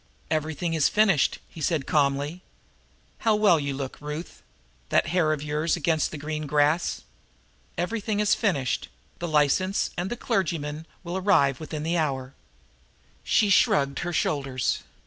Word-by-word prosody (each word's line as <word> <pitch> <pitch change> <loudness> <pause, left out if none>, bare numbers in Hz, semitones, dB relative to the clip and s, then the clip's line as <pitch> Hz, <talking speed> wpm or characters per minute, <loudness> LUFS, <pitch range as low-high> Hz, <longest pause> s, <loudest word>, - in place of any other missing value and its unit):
"Everything 160 +2 -1
is 155 -3 +3
finished," 195 - +3
he 160 - -11
said 155 -3 0
calmly. 145 +3 0 0.8
"How 220 -3 +3
well 205 -6 +4
you 140 -1 -2
look, 135 -1 -5
Ruth 150 +3 -6 0.5
that - - +3
hair 165 -4 +3
of 150 -2 -2
yours 150 +2 0
against 160 -2 +1
the 155 - -7
green 155 +1 -4
grass. 150 +3 +1 0.7
Everything 210 +3 -1
is 210 -1 +3
finished; 140 - 0 0.3
the 175 - -3
license 155 +6 +2
and 175 +2 -2
the 240 - -4
clergyman 160 - -2 0.2
will 175 +1 -3
arrive 160 -9 +3
here - - -15
within 150 0 -5
the 170 +2 0
hour." 135 -4 -2 0.9
She 210 -2 +3
shrugged 140 -7 +3
her 175 - -3
shoulders. 135 -6 0
155 Hz, 145 wpm, -26 LUFS, 145-180 Hz, 0.9 s, well